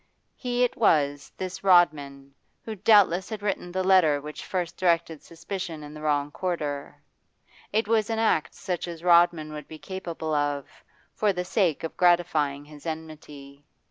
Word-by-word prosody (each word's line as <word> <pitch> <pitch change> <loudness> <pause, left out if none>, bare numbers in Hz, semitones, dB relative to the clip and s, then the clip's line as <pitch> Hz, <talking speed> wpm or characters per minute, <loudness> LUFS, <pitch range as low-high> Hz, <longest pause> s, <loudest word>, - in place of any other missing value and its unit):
He 245 0 -1
it 250 +1 0
was, 145 -9 +1
this 185 0 -6
Rodman, 145 -7 +2 0.3
who 220 - -4
doubtless 195 -3 +4
had 215 -2 -6
written 195 -3 -2
the 185 +1 -1
letter 180 -6 +4
which 150 +1 -8
first 180 -3 -3
directed 165 -3 0
suspicion 170 -1 -7
in 150 0 -10
the 150 - -10
wrong 145 -1 0
quarter; 145 -6 -4 0.7
it 220 +1 0
was 220 -1 +1
an 225 - -1
act 220 -8 +1
such 180 -2 -4
as 170 -1 -8
Rodman 170 -3 +4
would 150 -1 -8
be 155 - -10
capable 170 -3 -5
of, 145 -1 -1 0.5
for 210 -1 +1
the 180 0 -3
sake 180 -5 0
of 165 - -5
gratifying 160 -5 +2
his 150 +1 -12
enmity. 150 -3 -8
170 Hz, 160 wpm, -26 LUFS, 150-190 Hz, 0.7 s, doubtless